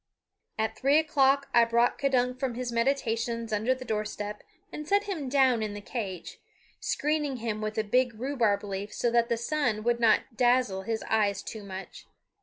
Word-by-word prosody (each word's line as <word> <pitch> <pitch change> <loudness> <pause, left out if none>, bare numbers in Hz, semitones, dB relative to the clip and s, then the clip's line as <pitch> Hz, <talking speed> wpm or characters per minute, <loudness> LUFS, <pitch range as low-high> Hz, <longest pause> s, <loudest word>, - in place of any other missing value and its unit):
At 220 0 -1
three 275 +3 +3
o'clock 280 -3 +3
I 235 - +7
brought 235 +1 +2
K'dunk 255 -2 +1
from 260 -3 -2
his 250 0 -3
meditations 230 -2 -1
under 220 +5 +1
the 255 0 -9
door 215 -2 -1
step 210 0 -6 0.3
and 300 0 -7
set 405 +3 +3
him 345 -10 -4
down 260 -4 +3
in 210 -1 -3
the - - -5
cage, 200 -4 -6 0.4
screening 295 -3 -1
him 220 -2 -3
with 215 +1 -3
a 220 - +2
big 240 +1 +1
rhubarb 240 -6 +1
leaf 200 0 -5
so 240 - 0
that 235 0 +2
the 235 - +1
sun 235 -4 -1
would 235 +1 +1
not 230 +1 +2
dazzle 245 -5 +2
his 220 +3 -3
eyes 210 -2 +1
too 220 -2 -7
much. 190 -1 -9
235 Hz, 185 wpm, -28 LUFS, 215-260 Hz, 0.4 s, I